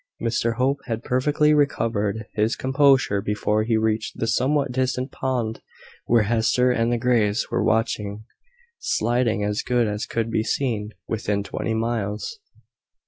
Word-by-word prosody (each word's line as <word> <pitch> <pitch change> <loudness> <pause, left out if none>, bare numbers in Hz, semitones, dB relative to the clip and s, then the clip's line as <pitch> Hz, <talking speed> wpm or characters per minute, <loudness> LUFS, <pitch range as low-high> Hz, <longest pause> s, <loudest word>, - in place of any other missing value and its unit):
Mr 115 0 0
Hope 135 +3 +1
had 115 0 -3
perfectly 150 +4 +2
recovered 115 -7 0
his 110 +2 +1
composure 135 -6 +3
before 105 +1 0
he 110 +1 +1
reached 110 0 -1
the - - -1
somewhat 135 +4 +1
distant 130 +1 -1
pond 120 -4 -2 0.5
where 115 -2 +4
Hester 120 +3 +2
and 115 -1 +1
the 120 - +1
Greys 115 -3 +1
were - - +1
watching 110 -1 -1 0.5
sliding 120 - 0
as 105 0 -1
good 125 -1 +1
as 105 0 -3
could 115 -1 -2
be 110 - +1
seen 110 -4 -1 0.2
within 105 -2 -1
twenty 110 +2 -3
miles. 110 - -2
115 Hz, 140 wpm, -23 LUFS, 110-125 Hz, 0.5 s, where